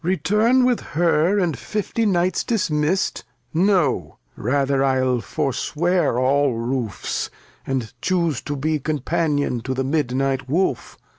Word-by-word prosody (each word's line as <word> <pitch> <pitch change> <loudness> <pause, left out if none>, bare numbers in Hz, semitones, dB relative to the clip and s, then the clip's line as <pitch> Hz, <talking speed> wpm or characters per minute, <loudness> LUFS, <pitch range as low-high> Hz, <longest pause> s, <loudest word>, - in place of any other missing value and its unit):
Lear. 180 +3 +1
Return 225 +7 +3
with 250 -2 +2 0.2
her, 170 +3 +3
and 175 -6 +1
fifty 215 - -2
Knights 180 -2 +1
dismisst, 185 -6 0 0.3
No, 160 - +1 0.2
rather 135 +3 +1
I'll 130 -2 +1
forswear 155 +3 0
aU 135 +1 +2
Roofs, 115 -2 -3 0.4
and 130 -5 -2
chuse 170 -7 0
To 145 - -4
be 155 +2 -1
Companion 145 -2 -1
to 130 +3 -3
the 130 - -1
Midnight 135 -2 -1
Wolf. 180 +7 -1
150 Hz, 125 wpm, -22 LUFS, 130-180 Hz, 0.4 s, Return